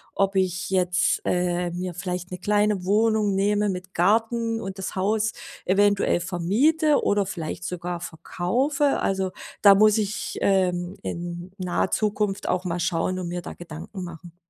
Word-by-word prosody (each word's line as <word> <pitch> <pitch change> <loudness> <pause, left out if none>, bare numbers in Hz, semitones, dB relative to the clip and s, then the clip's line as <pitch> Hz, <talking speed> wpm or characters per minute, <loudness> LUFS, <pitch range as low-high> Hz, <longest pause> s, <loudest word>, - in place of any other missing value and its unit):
ob 195 0 +1
ich 185 -1 0
jetzt, 180 -1 +2
äh, 180 0 0
mir 180 +1 -4
vielleicht 180 0 -4
'ne 180 - -5
kleine 205 0 +1
Wohnung 210 0 +2
nehme 205 +1 +2
mit 185 0 -5
Garten 225 +4 +1
und 195 -1 -6
das 190 - -4
Haus 210 +3 +1 0.3
eventuell 200 -1 +3
vermiete 250 - +2
oder 205 -1 +2
vielleicht 170 -2 -5
sogar 175 0 -4
verkaufe. 245 - 0
Also, 190 -1 0 0.3
da 200 -1 +8
muss 215 +1 +5
ich, 210 0 -3
ähm, 185 -1 +1
in 175 +1 -5
naher 180 0 -1
Zukunft 210 -2 0
auch 185 +1 0
mal 175 0 -2
schauen 175 +2 0
und 180 - -4
mir 175 0 -4
da - - -7
Gedanken 175 +3 -8
machen. 170 0 -10
190 Hz, 155 wpm, -24 LUFS, 175-205 Hz, 0.3 s, da